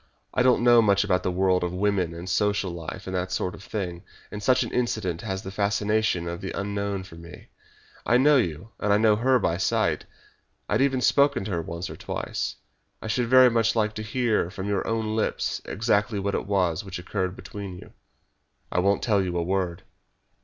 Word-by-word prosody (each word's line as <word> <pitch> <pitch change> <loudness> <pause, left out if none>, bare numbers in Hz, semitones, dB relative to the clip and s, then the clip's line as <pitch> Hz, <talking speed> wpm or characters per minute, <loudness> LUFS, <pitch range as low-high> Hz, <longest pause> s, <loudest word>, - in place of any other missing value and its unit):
I - - +2
don't 125 -1 +4
know 120 -1 +7
much 100 -2 +3
about 90 -3 +1
the - - -1
world 90 0 +2
and 90 +1 -3
women 95 -3 +1
and 85 +2 -8
social 100 0 +1
life 85 -2 -7
and 95 - -4
that 90 0 -2
sort 90 0 -1
of - - -11
thing, 90 -4 -4 0.3
and 105 - -6
such 130 +4 +3
an - - -6
incident 110 -8 -1
has 95 -3 -4
the 95 - -6
fascination 105 -2 0
of 85 0 -5
the 95 - -4
unknown 100 -1 -2
for 95 - -13
me. 85 +1 -12 0.5
I 120 - +3
know 145 +3 +5
you, 90 - -2
and 105 - 0
I 100 - +5
knew 105 -1 +4
her 130 +3 +3
by 85 -7 0
sight 95 - 0 0.6
I - - -2
had - - +2
even 135 -2 +2
spoken 140 -6 +3
to 105 - -4
her 85 -2 -1
once 85 +2 -5
or - - -8
twice. - - -4 0.4
I - - -10
should 115 +2 0
very 130 0 +7
much 115 0 +2
like 110 -1 +1
to 110 - -5
hear 110 -4 0
from 95 +1 -6
your 100 -2 -1
own 110 -1 -1
lips 110 - -1
exactly 105 0 0
what 100 0 -2
it - - -2
was 90 -5 +1
which 95 -2 -6
occurred 95 0 -3
between 100 -3 -8
you." - - -13 0.8
"I - - +1
won't 100 +2 +2
tell 105 -4 +2
you 90 -1 -2
a 85 - 0
word." 90 -1 -2
100 Hz, 210 wpm, -25 LUFS, 90-110 Hz, 0.8 s, know